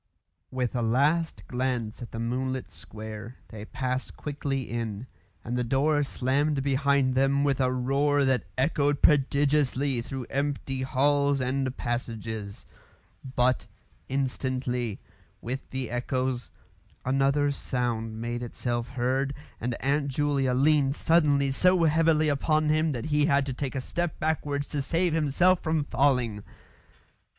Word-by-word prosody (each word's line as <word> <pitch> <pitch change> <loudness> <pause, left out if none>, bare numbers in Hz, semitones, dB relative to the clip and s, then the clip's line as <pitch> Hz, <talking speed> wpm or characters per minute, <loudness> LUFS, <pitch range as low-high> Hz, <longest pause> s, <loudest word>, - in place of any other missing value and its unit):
With 130 -1 -2
a 120 - 0
last 145 +8 +1
glance 125 -3 -2
at 120 - -7
the - - -6
moonlit 130 +3 -2
square, 110 +2 -8
they 110 -1 -8
passed 130 +2 -3
quickly 140 -2 -3
in, 115 -2 -4 0.4
and 120 - -2
the 125 - 0
door 145 +5 +2
slammed 140 +1 0
behind 140 -1 +2
them 135 +2 +2
with 140 -2 +1
a 130 -1 +2
roar 140 +3 +2
that 130 -4 +1
echoed 145 +1 +1
prodigiously 140 -2 +3
through 130 +1 -6
empty 135 -1 -2
halls 140 +2 +2
and 130 0 -1
passages. 110 -4 -4 0.7
But, 125 +1 +2 0.4
instantly, 130 -4 -2 0.4
with 130 +3 -5
the 130 -3 -4
echoes, 125 0 -2 0.6
another 135 +2 +2
sound 115 -5 -2
made 120 +1 -3
itself 120 0 -3
heard, 130 +2 -1 0.2
and 120 +1 -2
Aunt 140 +2 +1
Julia 140 -2 +1
leaned 140 0 +3
suddenly 145 -5 +3
so 180 +5 +3
heavily 160 0 +3
upon 155 +2 +2
him 155 +1 +2
that 120 -3 -4
he 150 -1 +2
had 140 -3 +3
to 135 - -3
take 135 +1 -4
a - - 0
step 175 +4 -3
backwards 145 -2 -1
to 145 - -2
save 170 +4 0
himself 165 +4 +3
from 160 -2 0
falling. 125 -6 +1
135 Hz, 135 wpm, -27 LUFS, 125-145 Hz, 0.7 s, prodigiously